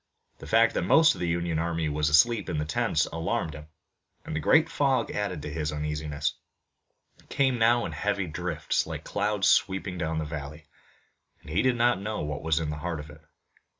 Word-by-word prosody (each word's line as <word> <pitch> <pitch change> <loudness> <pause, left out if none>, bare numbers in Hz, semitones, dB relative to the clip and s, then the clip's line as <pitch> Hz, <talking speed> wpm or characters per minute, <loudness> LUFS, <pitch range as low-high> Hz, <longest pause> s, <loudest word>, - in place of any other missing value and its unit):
The - - -10
fact - - +4
that - - 0
most 160 - +5
of - - -9
the 90 - 0
Union 85 -1 -1
army 85 -1 -1
was 75 0 0
asleep 110 +9 +4
in 85 - -2
the 75 - -1
tents 75 - +1
alarmed 80 -1 -2
him, 75 0 -10 0.6
and - - -5
the - - 0
great 160 - +4
fog 135 -4 0
added 95 -7 -3
to 75 - -6
his 75 -1 -2
uneasiness. 75 -1 -2 0.9
It - - -24
came 130 -3 +1
now 120 +1 +3
in - - -4
heavy 100 -2 -1
drifts 85 -1 -2
like - - -6
clouds 105 -2 0
sweeping 95 -2 +1
down 80 -1 -2
the 80 - -2
valley, 75 +1 -7 0.8
and - - -11
he 85 - +2
did 130 -1 +2
not 120 -3 +2
know 105 +1 -3
what 75 -1 -4
was 80 0 +1
in 80 -2 -2
the 75 - -5
heart 85 -2 -3
of 75 +1 -9
it. 75 +1 -15
85 Hz, 205 wpm, -27 LUFS, 75-105 Hz, 0.9 s, most